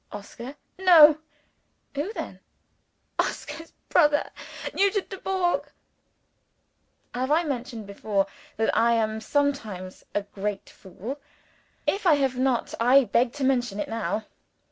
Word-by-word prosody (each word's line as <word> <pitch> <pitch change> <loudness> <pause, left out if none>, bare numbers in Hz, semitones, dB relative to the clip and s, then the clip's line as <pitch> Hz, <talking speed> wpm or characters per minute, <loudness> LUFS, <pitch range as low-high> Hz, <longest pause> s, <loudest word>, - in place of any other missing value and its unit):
"Oscar?" 235 +6 -8 0.2
"No." 315 -5 +8 0.7
"Who 290 +8 -2
then?" - - -6 0.8
"Oscar's 330 0 -3 0.2
brother. 295 -3 +3 0.4
Nugent 400 0 +1
Dubourg." 375 -2 -1 1.4
(Have 255 +2 -2
I 320 +3 +3
mentioned 250 -6 -4
before, 200 0 -1 0.3
that 220 - +1
I 235 +1 +4
am 220 -1 0
sometimes 220 -9 -2
a 205 - +1
great 200 0 -5
fool? 210 +9 -8 0.7
If 395 -1 0
I 315 - +7
have 270 -3 0
not, 255 -1 0
I 255 +4 +6
beg 240 0 +2
to 290 - -4
mention 245 -6 +1
it - - -3
now. 220 -1 -2
255 Hz, 120 wpm, -26 LUFS, 220-295 Hz, 1.4 s, No